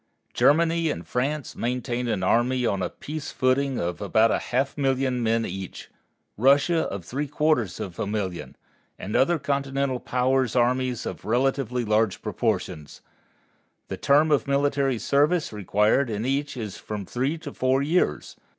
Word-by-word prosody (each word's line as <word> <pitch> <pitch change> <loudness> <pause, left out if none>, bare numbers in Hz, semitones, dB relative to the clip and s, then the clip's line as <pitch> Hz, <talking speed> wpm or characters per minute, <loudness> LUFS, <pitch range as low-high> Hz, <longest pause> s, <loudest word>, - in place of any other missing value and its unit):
Germany 165 +2 +3
and 85 - -4
France 140 +3 -2
maintain 125 0 -2
an 105 -5 -1
army 125 +5 +2
on 100 -4 0
a 90 - -1
peace 155 0 -7
footing 130 0 +1
of 85 +2 -3
about 110 +3 +3
a - - +1
half 135 +3 -1
million 135 -2 0
of - - -2
men 115 0 +1
each, 95 -2 -7 0.5
Russia 140 - +4
of 95 -4 -6
three 145 +8 -3
quarters 145 - 0
of 90 -3 -6
a - - -1
million, 100 -4 -4 0.4
and 105 - -5
other 170 +6 +3
Continental 140 -2 -1
powers 130 0 0
armies 125 0 +1
of - - -6
relatively 125 0 0
large 105 -2 +1
proportions. 95 - -3 0.9
The - - -4
term 150 +3 +3
of 145 - +2
military 140 -2 +1
service 150 +5 +1
required 105 +5 +2
in 110 +1 -3
each 140 +1 -1
is 110 -5 -5
from 105 -2 -6
three 130 - -1
to 150 -3 -8
four 130 +2 +1
years. 150 - 0
130 Hz, 155 wpm, -25 LUFS, 110-140 Hz, 0.9 s, Russia